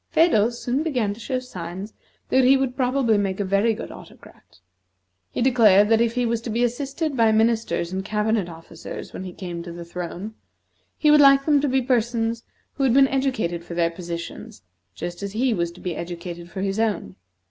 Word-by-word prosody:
Phedo 235 -10 +4
soon 245 +3 -2
began 250 -10 0
to 210 - -14
show 255 +2 -2
signs 190 -4 -7 0.4
that 260 - +4
he 265 +2 +6
would 265 -2 -1
probably 250 -4 +2
make 195 -1 -2
a 200 - 0
very 200 +4 +2
good - - -7
Autocrat. - - -15 0.7
He - - -2
declared 215 -6 +5
that 225 0 +4
if 235 0 +1
he 250 -1 +1
was 230 -1 -1
to 230 - -6
be 230 +2 0
assisted 275 +5 -2
by 225 -3 +4
ministers 220 -5 +1
and 190 0 -2
cabinet 210 -2 0
officers 165 0 -9
when 190 - -6
he 185 - -6
came 175 -2 -6
to 170 0 -8
the 170 0 -8
throne, 180 +4 -6 0.6
he 300 - +4
would 300 0 +7
like 275 -1 +6
them 295 -3 +4
to 290 - +1
be 260 0 +1
persons 235 -2 0 0.3
who 275 - -2
had 255 -2 +3
been 275 0 +6
educated 255 -11 -1
for 170 0 -8
their 170 -1 +1
positions, 170 - -7 0.3
just 175 +1 -6
as 200 0 -5
he 245 +2 +1
was 170 -4 -1
to 175 - -15
be 180 -3 -4
educated 170 +1 -7
for 190 - -6
his 195 +2 -1
own. 210 - -1
220 Hz, 200 wpm, -23 LUFS, 180-255 Hz, 0.7 s, would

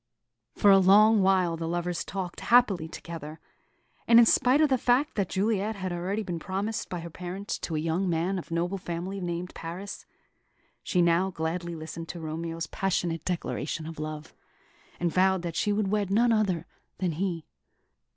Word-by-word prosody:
For 205 - +5
a 195 - +7
long 210 +3 +6
while 185 -3 +3
the 165 0 -4
lovers 175 +1 -2
talked 185 -3 -5
happily 215 -9 +3
together; 160 -2 -8 0.7
and 230 - +7
in 235 - +9
spite 250 +5 +4
of 310 -1 +4
the 260 -2 +2
fact 255 +6 +2
that 200 -4 -1
Juliet 210 +2 0
had 185 -2 -4
already 190 +5 -2
been 175 -4 -4
promised 195 +6 -3
by 175 -2 -4
her 170 - -7
parents 185 +4 -5
to 160 - -4
a - - 0
young 165 +4 0
man 175 +3 0
of - - -10
noble 175 +3 -1
family 180 +3 -5
named 175 0 -4
Paris, 180 +5 -7 0.7
she 180 -2 +1
now 170 +3 +3
gladly 170 0 -3
listened 160 +1 -7
to 175 - -6
Romeo's 165 +1 -4
passionate 170 -4 -1
declaration 165 -3 -3
of 160 -1 -8
love, 155 0 -6 0.7
and 170 -1 0
vowed 190 -1 +3
that 170 -2 -4
she 210 - +1
would 205 -1 0
wed 205 -2 0
none 230 +4 +3
other 195 -7 +1 0.3
than 180 -2 0
he. 170 0 -3
180 Hz, 175 wpm, -28 LUFS, 165-200 Hz, 0.7 s, in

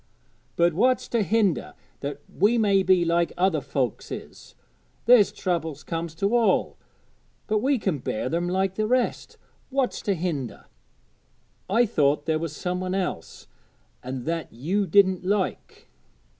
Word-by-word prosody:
'But 170 0 +3
what's 250 +9 +2
to 235 - +1
hinder 205 -4 +1 0.2
that 145 0 -5
we 210 +6 +2
may 200 -3 +3
be 185 -2 +3
like 170 -1 +1
other 180 -4 +2
folks 135 -4 -3
is? - - -9 0.5
There's 235 -3 +6
troubles 165 -5 -3
comes 165 -1 -4
to 200 +7 0
all, 235 -2 +2 0.7
but 215 -1 +1
we 270 +4 +2
can 190 - -1
bear 110 - -3
them 170 +5 -1
like 190 +1 0
the 215 +2 -1
rest. 250 +1 -1 0.3
What's 270 -2 -1
to 200 - 0
hinder? 155 -8 -4 1.0
I 230 +5 +4
thought 145 -8 +1
there 160 -1 +1
was 160 -2 -4
some 180 0 -3
one 185 0 -2
else, 180 - -4 0.6
an' 130 0 -5
that 165 0 -3
you 180 - -1
didn't 190 +1 +4
like. 195 0 -2
180 Hz, 145 wpm, -25 LUFS, 160-205 Hz, 1.0 s, There's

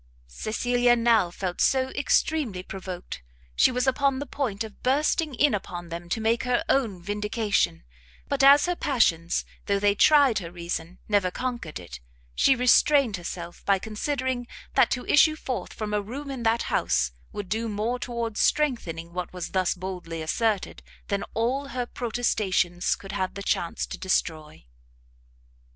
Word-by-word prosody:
Cecilia 240 - +1
now 230 -6 +3
felt 180 0 -4
so 260 -1 +3
extremely 270 -8 0
provoked, 185 - -7 0.3
she - - +5
was 250 +1 0
upon 275 0 +2
the 285 - -4
point 245 -7 -2
of 220 -2 -11
bursting 295 +2 +1
in 290 +3 +3
upon 175 -4 -5
them 170 +1 -7
to 225 - -1
make 225 +1 +1
her 250 -1 0
own 220 -10 +1
vindication; 210 - 0 0.4
but 280 -1 0
as 280 +1 +8
her 355 0 0
passions, 175 - +1 0.2
though 200 - +2
they 205 0 +3
tried 275 -1 +5
her 170 -3 -8
reason 170 0 -5
never 205 -3 +2
conquered 235 - -4
it, 65 -9 -10 0.3
she 265 - +4
restrained 250 -2 +4
herself 175 0 -7
by 200 -1 +3
considering 245 +4 -3 0.3
that - - +4
to 250 - -2
issue 310 +1 +5
forth 260 -5 -4
from 210 -1 -5
a 210 - +1
room 275 +7 -7
in 265 -3 -5
that 230 0 +2
house, - - +1 0.2
would 205 -2 -6
do 225 +3 -2
more 220 +4 -2
towards 235 -3 -3
strengthening 175 - 0
what 180 0 -4
was 180 -2 -6
thus 185 -1 +1
boldly 180 -3 -6
asserted, 215 +4 -1 0.3
than 200 0 0
all 255 +5 0
her 250 -1 -3
protestations 215 -8 0
could 195 - -10
have 190 -2 -2
chance 170 - -1
to - - -8
destroy. 155 - -2
220 Hz, 155 wpm, -26 LUFS, 180-255 Hz, 0.4 s, as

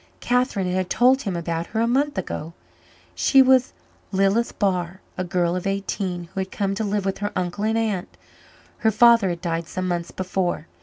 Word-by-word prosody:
Catherine 245 -7 0
had 185 0 -1
told 255 +5 +4
him 195 -7 -3
about 170 0 -3
her 220 - -3
a 230 - +3
month 275 +2 +1
ago. 165 -3 -4 0.6
She 270 - +3
was 260 -1 +4 0.4
Lilith 195 +4 +1
Barr, 185 -2 -1 0.2
a 185 - -2
girl 175 -1 0
of 185 +1 -3
eighteen, 195 -3 -3
who - - -3
had 190 0 -2
come 195 -1 -1
to 215 +3 -2
live 205 -1 -1
with 195 - -2
her 205 0 -2
uncle 185 +3 -2
and 220 +1 +1
aunt. 210 -5 -2 0.6
Her 220 - +3
father 230 -2 +5
had 170 -1 -4
died 165 -2 -2
some 185 +1 -3
months 175 -1 -2
before. 185 -1 -2
195 Hz, 190 wpm, -23 LUFS, 180-220 Hz, 0.6 s, father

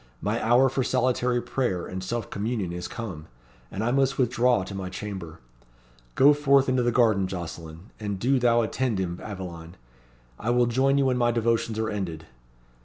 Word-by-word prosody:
My - - -2
hour 120 +3 +5
for 130 0 -1
solitary 125 -1 +1
prayer 110 -10 -1
and 95 0 -6
self 115 +3 -4
communion 105 -3 -2
is 90 0 -5
come, 90 -10 -7 0.4
and 100 - -4
I 120 - +1
must 135 0 +1
withdraw 125 -3 +2
to 95 - -8
my 95 -1 -5
chamber. 95 -4 -7 0.8
Go 145 +2 +7
forth 140 -2 +3
into 130 -1 +2
the 120 0 +1
garden, 110 -6 +3
Jocelyn 85 0 -8
and 105 -2 -3
do 130 +7 +2
thou 120 -1 +3
attend 120 0 -1
him, 90 -2 -3
Aveline. 90 -5 -8 0.6
I 115 - -3
will 120 0 +3
join 135 +4 +2
you 140 - +3
when 130 -1 +1
my 120 0 +3
devotions 115 -1 0
are 110 0 -1
ended." 85 -6 -4
115 Hz, 180 wpm, -26 LUFS, 95-125 Hz, 0.8 s, Go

